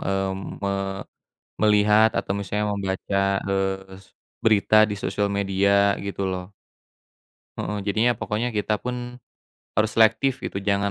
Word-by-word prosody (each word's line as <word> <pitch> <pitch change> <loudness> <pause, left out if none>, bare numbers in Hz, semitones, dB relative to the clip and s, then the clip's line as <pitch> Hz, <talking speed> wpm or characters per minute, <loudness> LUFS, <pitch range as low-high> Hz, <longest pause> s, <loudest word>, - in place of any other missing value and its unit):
mmm, 95 0 -3
me 100 - 0 0.9
melihat 105 +1 +5
atau - - -4
misalnya 105 +1 -2
membaca, 100 0 -3 0.3
eee 95 -1 -2
s - - -21 0.4
berita 110 -1 +3
di 105 - -2
sosial 105 -1 0
media 100 0 +1 0.4
gitu, 100 0 -4
loh. 90 -1 -3 1.1
Heeh, 105 - -3
jadinya 110 +4 +3
pokoknya 110 +3 -2
kita 105 +1 0
pun 125 0 -2 0.8
harus 110 +1 +2
selektif, 110 +4 +4
gitu, - - -4
jangan 100 0 +1
100 Hz, 125 wpm, -24 LUFS, 95-110 Hz, 1.1 s, melihat